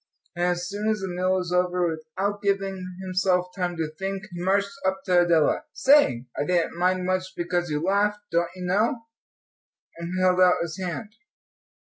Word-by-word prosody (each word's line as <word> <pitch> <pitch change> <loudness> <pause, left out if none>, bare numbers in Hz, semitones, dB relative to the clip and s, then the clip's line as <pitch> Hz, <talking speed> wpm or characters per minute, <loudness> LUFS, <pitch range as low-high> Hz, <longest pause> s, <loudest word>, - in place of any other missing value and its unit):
And 175 - -1
as 175 0 0
soon 205 +3 -2
as 215 - +1
the 190 - -3
meal 180 +1 0
was 180 -1 -2
over, 180 0 +2
without 170 +6 -3
giving 195 -2 -2
himself 185 -1 +1
time 180 -2 -2
to 160 -1 -1
think, 195 0 -3
he 175 0 -6
marched 200 +2 +1
up 190 0 -1
to 180 -2 +4
Adela. 170 - +2
"Say, 260 - +4
I - - -1
didn't 175 +1 0
much 185 +1 +3
mind 185 0 +1 0.2
because 175 0 -1
you 150 +1 -1
laughed, 200 +3 +2
don't 170 0 +1
you 180 -1 -6
know," 220 +7 +1 0.9
and 170 +2 -4
held 185 0 +3
out 180 -1 +6
his 170 +1 -6
hand. 190 +4 -4
185 Hz, 175 wpm, -25 LUFS, 175-195 Hz, 0.9 s, out